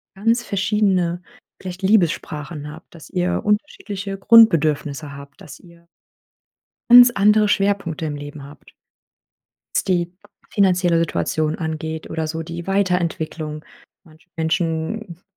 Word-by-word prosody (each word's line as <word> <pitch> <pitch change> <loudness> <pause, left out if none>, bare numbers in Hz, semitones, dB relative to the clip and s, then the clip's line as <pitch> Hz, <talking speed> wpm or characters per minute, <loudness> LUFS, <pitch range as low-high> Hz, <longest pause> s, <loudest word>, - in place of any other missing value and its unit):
ganz 230 +4 +1
verschiedene, 190 -4 0 0.4
vielleicht 185 0 -7
Liebessprachen 165 -6 0
habt, 150 - -15
dass 160 -3 -13
ihr 180 -1 -1
unterschiedliche 205 -3 -3
Grundbedürfnisse 155 -9 +3
habt, 140 0 -13
dass - - -12
ihr 170 -1 -20 1.0
ganz 245 0 +10
andere 210 0 +4
Schwerpunkte 195 -6 0
im 150 -1 -4
Leben 145 0 -9
habt 145 0 -15 1.0
was - - +1
die 175 -2 0 0.4
finanzielle 180 -4 +2
Situation 155 -1 -1
angeht 160 0 -5
oder 160 -1 -2
so 160 +1 -4
die 170 +1 -8
Weiterentwicklung. 170 -5 -2 0.4
Manche 160 0 -21
Menschen 165 +3 -2
170 Hz, 115 wpm, -20 LUFS, 155-195 Hz, 1.0 s, ganz